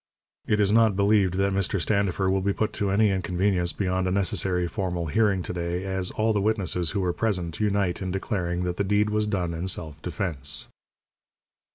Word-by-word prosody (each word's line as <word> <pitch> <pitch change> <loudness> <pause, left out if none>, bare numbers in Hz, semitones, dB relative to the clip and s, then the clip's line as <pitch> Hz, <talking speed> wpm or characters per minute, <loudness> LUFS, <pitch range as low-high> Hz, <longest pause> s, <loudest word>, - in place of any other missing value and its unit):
It 105 - +2
is 100 -1 +3
not 110 -2 +4
believed 100 -2 +3
that 100 +1 +1
Mr. 100 0 0
Standifer 100 0 +1
will 95 0 +2
be 100 +1 +1
put 110 +1 -1
to 100 -2 -1
any 105 +1 +3
inconvenience 90 -1 0
beyond 95 -1 -1
a - - 0
necessary 90 -2 0
formal 90 -1 -3
hearing 95 +2 +1
to - - -4
day, 90 +1 -3
as 95 -1 -1
all 110 0 0
the 105 - +1
witnesses 95 -5 0
who 100 - -1
were 90 -2 0
present 90 -7 -2
unite 100 -4 0
in 95 - -3
declaring 90 -2 -2
that 90 0 -2
the - - +1
deed 105 +2 +1
was 105 0 +1
done 90 -5 -1
in 85 +3 -3
self 80 -4 -2
defence. 80 -5 -3
95 Hz, 195 wpm, -26 LUFS, 90-100 Hz, -, not